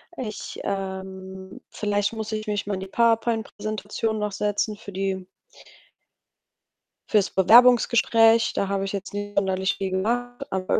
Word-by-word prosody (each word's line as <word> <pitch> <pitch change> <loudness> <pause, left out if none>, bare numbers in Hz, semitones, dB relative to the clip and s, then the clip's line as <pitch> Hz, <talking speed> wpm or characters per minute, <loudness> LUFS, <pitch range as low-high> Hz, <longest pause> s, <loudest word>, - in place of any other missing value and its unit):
Ich 215 - -6
ähm, 190 -1 -6
vielleicht 205 0 -1
muss 220 -1 -5
ich 215 0 -4
mich 205 -1 -2
mal 205 - -3
in - - -5
die 190 - -6
Power-Point 225 +1 +1
Präsentation 215 +1 -3
noch 210 0 -2
setzen 210 +2 -1
für 200 - -10
die 190 -1 -2 1.8
für's 205 -2 +3
Bewerbungsgespräch. 230 +1 +5
Da 200 - -1
habe 195 0 -1
ich 195 - -4
jetzt 200 -1 -5
nicht 205 0 -5
sonderlich 190 0 +1
viel 190 -1 -3
gemacht, 245 +7 -2
aber 190 -1 0
205 Hz, 145 wpm, -24 LUFS, 190-220 Hz, 1.8 s, Bewerbungsgespräch